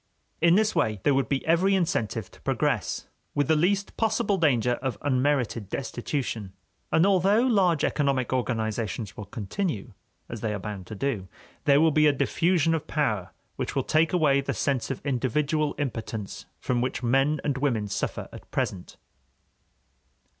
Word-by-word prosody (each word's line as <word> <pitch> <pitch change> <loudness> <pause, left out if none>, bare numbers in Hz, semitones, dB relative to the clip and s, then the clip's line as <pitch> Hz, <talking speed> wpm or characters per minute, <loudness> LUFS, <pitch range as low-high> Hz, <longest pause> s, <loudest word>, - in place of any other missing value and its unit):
In 170 +1 +6
this 215 +1 +3
way 110 - +1
there 145 - +4
would 135 0 +1
be 135 -2 -1
every 180 +4 +3
incentive 115 - -1
to - - -19
progress, - - -1 0.3
with 145 -2 +1
the 160 - +4
least 195 +6 +1
possible 215 -3 +1
danger 125 -6 +2
of 130 -2 -2
unmerited 130 -6 0
destitution. 120 -6 -3 0.4
And 160 - +4
although 200 +3 +4
large 195 - +3
economic 135 -4 +1
organizations 110 -3 -2
will 105 - -8
continue, 110 - -3 0.3
as 115 -3 -7
they 110 -2 -1
are - - -4
bound 95 -2 -6
to 110 - -7
do, 105 -5 -2 0.4
there 140 0 +5
will 160 +1 +5
be 150 +1 +4
a 145 - +4
diffusion 165 +2 +2
of 160 - -2
power 110 - 0 0.3
which - - -3
will - - +1
take 155 +1 +2
away 150 -6 +3
the 135 - -3
sense 135 -4 0
of 135 +1 -5
individual 145 +3 0
impotence 115 -6 -4
from 125 -1 0
which 125 0 -2
men 135 +5 +2
and 140 -3 -1
women 120 -7 0
suffer 100 - -3
at - - -12
present. 90 -2 -3
140 Hz, 160 wpm, -26 LUFS, 115-160 Hz, 0.4 s, In